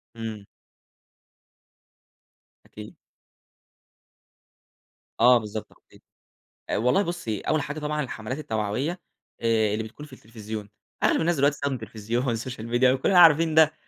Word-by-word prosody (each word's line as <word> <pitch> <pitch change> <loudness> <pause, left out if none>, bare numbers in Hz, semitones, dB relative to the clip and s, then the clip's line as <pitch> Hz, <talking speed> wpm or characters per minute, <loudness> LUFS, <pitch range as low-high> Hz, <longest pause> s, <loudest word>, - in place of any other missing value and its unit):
إمم. 110 -3 -6 2.2
أكيد. 105 0 -11 2.2
آه، 125 +1 +7
بالضبط، 105 -1 -6
تخطيط. - - -23 0.7
والله 125 - +2
بُصّي، 170 - -3
أول 155 -1 0
حاجة 145 +1 -5
طبعًا 150 0 -2
الحمَلات 125 +1 -5
التوعوية، 125 - -2 0.4
آآ 110 -2 +2
اللي 110 - -2
بتكون 110 +7 -10
في 145 - -16
التلفزيون، 110 -3 -8 0.3
أغلب - - +3
الناس 170 +1 +1
دلوقتي 140 0 +3
بتستخدم 140 -1 -2
التلفزيون 115 +1 -4
والسوشيال 115 0 -4
ميديا 120 +2 +3
وكلنا 135 +8 +3
عارفين 165 -1 +6
ده: 160 -1 +6
125 Hz, 115 wpm, -25 LUFS, 110-150 Hz, 2.2 s, آه